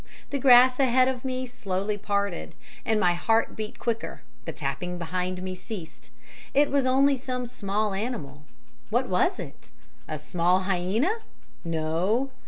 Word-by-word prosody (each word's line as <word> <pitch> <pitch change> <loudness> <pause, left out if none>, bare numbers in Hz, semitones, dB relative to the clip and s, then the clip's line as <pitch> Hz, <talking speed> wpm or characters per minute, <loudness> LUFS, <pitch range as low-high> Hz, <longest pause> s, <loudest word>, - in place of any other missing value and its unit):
"The 280 - -1
grass 255 0 +7
ahead 255 -1 +4
of 260 -2 -2
me 255 -1 -2
slowly 210 -5 -2
parted; 200 -3 -2 0.3
my 210 -6 +3
heart 225 +6 +1
beat 215 -1 -5
quicker, 230 -1 -3 0.2
the - - -3
tapping 145 +6 -3
behind 180 +2 -3
me 185 0 -3
ceased 185 -2 -9 0.5
it 290 +1 +4
was 275 -2 +2
only 270 +1 +4
some 250 -1 -3
small 210 -3 -1
animal. 195 - -4 0.5
What - - +1
was - - +2
it? - - -9 0.4
A 155 - -3
small 175 +4 +1
hyaena? 195 - +1 0.5
No. 170 +11 0
210 Hz, 140 wpm, -27 LUFS, 180-255 Hz, 0.5 s, grass